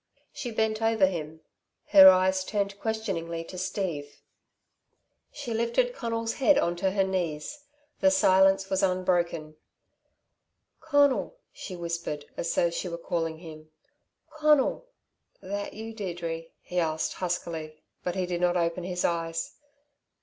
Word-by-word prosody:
She 245 - -5
bent 220 -1 0
over 225 -3 +4
him; 160 -4 -4 0.5
her 190 -2 +10
eyes 185 0 +3
turned 200 0 -2
questioningly 185 -7 -3
to 175 - -11
Steve. 175 -6 -4 1.1
She 235 - -5
lifted 235 - +1
Conal's 230 - -2
head 280 +1 +4
on 175 -10 +1
to 190 +2 +1
her 195 0 +1
knees. 185 - -3 0.3
The 285 - +5
silence 195 -8 +4
was 190 0 0
unbroken. 175 -4 0 1.2
"Conal," 285 - +2 0.2
she 185 - -7
whispered 170 -4 -4
as 170 - -2
though 170 - +2
she 180 +2 -3
were 170 - -5
calling 165 -1 -2
him, 155 -2 -11 0.6
"Conal!" 305 - +2 0.5
"That 200 +2 -5
you, 225 +1 -7
Deirdre?" 170 -5 -4 0.2
he 180 - -2
asked 160 -2 -1
huskily, 165 -3 -4 0.2
but 180 0 -2
he 185 -1 0
did 175 -1 -3
not 180 0 +2
open 170 +1 -1
his 180 0 -2
eyes. 165 -1 -2
185 Hz, 135 wpm, -27 LUFS, 170-220 Hz, 1.2 s, her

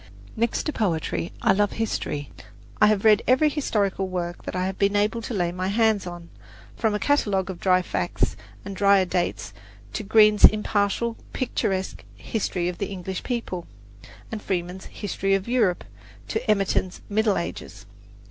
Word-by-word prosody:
Next 235 +1 0
to 305 - -2
poetry 160 - -1
I - - +5
love 205 0 +1
history. 145 -10 -3 0.5
I 210 - +8
have 210 0 +1
read 215 -1 +6
every 260 +5 +4
historical 205 -10 -1
work 175 -1 -4
that - - -5
I 180 0 0
have 190 0 -4
been 200 0 +2
able 210 +3 +1
to 230 - -5
lay 175 -3 0
my 185 +1 -3
hands 215 -1 +2
on, 175 -1 -8 0.5
from 220 -3 0
a - - -1
catalogue 200 -10 +1
of 175 - -9
dry 185 0 +3
facts - - -1 0.3
and 200 - -6
dryer 200 0 +4
dates 175 - -2 0.4
to - - -2
Green's 215 0 +4
impartial, 215 +2 +4 0.2
picturesque 195 -7 -2
"History 185 -5 -2
of 180 -1 -4
the 200 - -1
English 190 -1 -5
People"; 230 -8 -4 0.6
from 220 - -3
Freeman's 180 -1 -3
"History 195 -1 -1
of 195 +2 -3
Europe" 225 -8 +1 0.5
to - - 0
Emerton's 195 -3 +1
"Middle 215 -1 +1
Ages." 170 -11 -6
200 Hz, 160 wpm, -24 LUFS, 185-215 Hz, 0.6 s, I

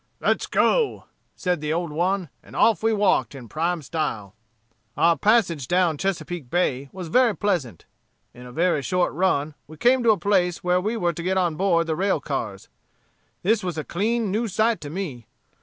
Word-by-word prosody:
'Let - - 0
go!' 465 -4 +2 0.3
said 180 -4 -1
the 150 0 -2
old 170 0 -1
one, 180 +2 0
and - - -15
off 225 -2 +3
we 225 +1 +2
walked 200 - +1
in 125 -3 -10
prime 165 +4 -2
style. 130 - -3 0.6
"Our 170 0 +4
passage 180 - +2
down 175 -3 +2
Chesapeake 175 -6 -3
Bay 140 -5 0
was 185 -2 -7
very 240 +2 +3
pleasant. 150 - -2 0.5
In 125 +1 -12
a - - -10
very 165 +2 +1
short 180 +4 0
run 155 -3 0
we 155 - -12
came 250 +8 +3
to 235 - +2
a 215 - +5
place 180 -2 +1
where 180 0 +2
we 215 +4 -2
were 175 -4 0
to 170 - -6
get 185 +2 0
on 175 -4 +1
board 170 -2 +2
the 160 -1 -1
rail 190 -1 +1
cars. 135 -9 -4 0.8
This 210 +2 +2
was 175 -3 -3
a 155 - -2
clean 215 +5 -1
new 225 +4 0
sight 220 +3 +1
to 145 - -7
me. 145 - -5
175 Hz, 190 wpm, -24 LUFS, 155-200 Hz, 0.8 s, a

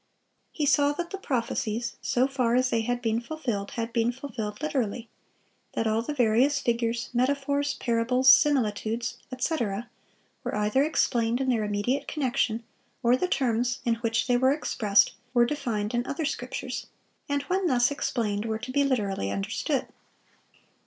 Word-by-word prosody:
He 300 - -1
saw 285 0 +4
that 345 +3 -5
the 390 - -5
prophecies, 235 - -2
so 250 +1 +2
far 255 -3 +1
as 255 0 +2
they 230 - +2
had 245 +2 -2
been 225 0 +1
fulfilled, 235 -8 -4
had 230 0 -3
been 230 0 +2
fulfilled 235 -5 -6
literally; 255 -6 -2 0.6
that 225 - -1
all 220 +1 +2
the 235 - -4
various 255 +2 +3
figures, 235 -1 -1
metaphors, 280 +3 +1
parables, 245 +2 +1
similitudes, 235 -4 +3
etc., 240 -5 -2 0.5
were - - -3
either 210 +5 +2
explained 240 -6 +1
in 265 -1 0
their 230 -4 +2
immediate 210 +6 -1
connection, 240 -5 0 0.4
or 240 +1 +5
the 360 - 0
terms 245 -4 +1
in 235 - +3
which 230 -1 0
they 245 -1 +3
were 260 +2 +4
expressed 215 -8 +2 0.2
were 240 0 +6
defined 235 -6 -2
in 240 0 +1
other 300 +3 -2
scriptures, 285 - -4 0.4
and 285 0 0
when 375 0 0
thus 245 -3 +3
explained, 220 -7 -1
were 220 -1 -1
to 255 - -7
be 285 +2 +3
literally 205 - 0
understood. 100 0 -1
245 Hz, 155 wpm, -27 LUFS, 225-275 Hz, 0.6 s, were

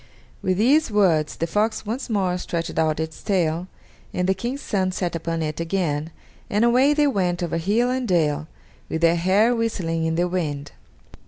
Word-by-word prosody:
With 185 -1 0
these 275 +9 +4
words 180 -8 +2
the 165 - -1
fox 210 +6 0
once 240 +5 -4
more 190 -5 +1
stretched 170 -2 -3
out 155 -1 +1
its 160 0 -4
tail, 175 -3 0 0.5
and 180 0 0
the 190 - +4
King's 240 +8 -4
son 190 -6 0
sat 180 -2 -2
upon 165 0 -2
it 155 0 -3
again, 165 -3 -1 0.4
and 210 +3 +2
away 260 +5 +4
they 295 0 +3
went 180 -9 0
over 165 -1 -1
hill 215 +9 +1
and 255 -1 -1
dale, 155 -4 +1 0.4
with 160 - -2
their 170 0 +4
hair 195 +8 +3
whistling 175 -8 -1
in 160 - 0
the 175 +2 +1
wind. 150 -6 -3
180 Hz, 180 wpm, -23 LUFS, 165-215 Hz, 0.5 s, these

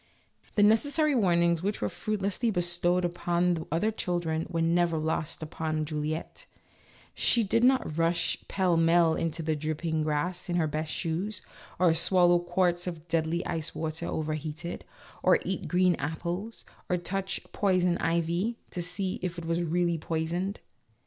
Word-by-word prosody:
The 205 - +4
necessary 285 +8 +3
warnings 170 -7 +3
which 200 +3 -2
were - - 0
fruitlessly 210 +2 -1
bestowed 175 -1 +1
upon 175 0 +1
the 160 -2 -4
other 175 +8 +1
children 170 -5 -2
were 165 -1 0
never 170 0 +2
lost 155 0 -2
upon 155 -1 -2
Juliette; 155 - -4 0.7
she 235 - +3
did 230 +3 +1
not 250 - +2
rush 170 +1 +2
pell 185 -3 +1
mell 165 0 +4
into 165 0 -2
the 155 0 0
dripping 155 +1 -2
grass 155 +5 -1
in 175 - 0
her 170 -2 +2
best 155 +1 -3
shoes, 185 +4 -2 0.3
or 180 -3 +4
swallow 175 +1 +5
quarts 175 0 0
of 170 -2 -6
deadly 165 +1 0
ice 160 -1 -3
water 160 +1 -3
when - - -3
overheated, 155 +2 -4 0.4
or - - +5
eat 190 - -3
green 180 0 +3
apples, 170 +9 -4 0.2
or 180 - +2
touch 195 +2 -2
" - - -33
poison 180 -3 +2
ivy 170 +7 0
" - - -36
to 180 - -3
see 185 +2 -1
if 180 -1 -3
it 170 - -6
was 165 +1 0
really 170 0 0
poisoned. 170 +5 -2
175 Hz, 160 wpm, -28 LUFS, 160-185 Hz, 0.7 s, swallow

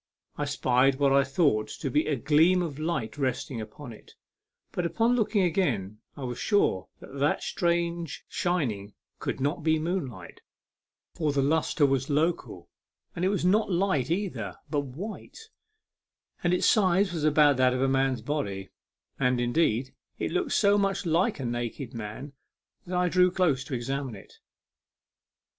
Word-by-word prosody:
I 145 - -2
spied 135 -1 +2
what 140 0 +2
I 140 0 +5
thought 140 -5 +1
to 135 - -5
be 150 +5 +2
a 150 - +1
gleam 160 +8 +3
of 155 -4 -5
light 145 -5 -3
resting 130 -2 -2
upon 115 +4 -9
it; - - -17 0.6
but 175 +4 -3
on 235 +2 +4
looking 215 -4 +2
again 120 - 0 0.2
I 140 - -6
was 125 -1 -4
sure 95 - +1
that 140 - -10
that 145 +2 +1
strange 170 -2 -1
shining 115 - -2 0.2
could - - -3
not 145 +6 -1
be 160 +1 +2
moonlight, 150 - -4 0.7
for 155 -3 0
the 140 -1 +1
lustre 155 +1 +2
was 135 0 0
local, 160 +4 -1 0.5
and 170 - -3
it - - +3
was 195 -3 -1
not 205 +3 +3
light 175 -8 +1
either, 190 +3 -2 0.2
but 150 - +1
white, 155 - -8 1.1
and 175 - +2
its 180 - +2
size 190 -2 +3
was 160 -3 -3
about 150 -2 +5
that 130 -1 +3
of 130 - -1
a - - +3
man's 135 -3 +1
body; 100 -9 -3 0.5
and, 125 -2 +2
indeed, 120 0 +1 0.2
it - - -2
looked 365 -1 -1
so 205 0 +4
much 195 -1 0
like 170 +4 +1
a 130 - -3
naked 120 +2 -4
man 115 +5 -7 0.5
that 180 0 -2
I 180 0 +2
drew 180 +1 +4
close 170 -7 +1
to 130 - -4
examine 130 0 -3
it. 100 - -14
145 Hz, 160 wpm, -27 LUFS, 130-175 Hz, 1.1 s, I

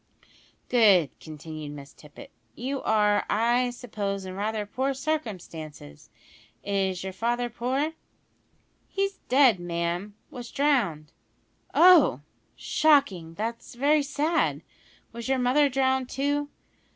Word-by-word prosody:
"Good," 200 - +4
continued 155 -1 -8
Miss 140 -1 -11
Tippet. 150 -1 -14 0.2
"You 265 +3 -4
are, 210 -1 +2
I 240 +3 +2
suppose, 205 -5 -4
in 185 - -6
rather 210 +2 -2
poor 265 +6 -2
circumstances. 180 - -6 0.5
Is 190 -2 -1
your 190 0 -5
father 240 +4 -1
poor?" 265 +7 -1 1.0
"He's 395 0 -2
dead, 255 -6 +5
ma'am; 175 +3 -3 0.2
was 245 -1 -8
drowned." 225 - 0 0.6
"Oh! 335 - +6 0.3
shocking, 240 - +2
that's 230 +4 -5
very 290 +4 +3
sad. 300 +4 0 0.5
Was 235 +2 -7
your 265 - +2
mother 260 +4 +3
drowned, 265 -1 0
too?" 285 +2 -1
235 Hz, 110 wpm, -26 LUFS, 185-270 Hz, 1.0 s, Oh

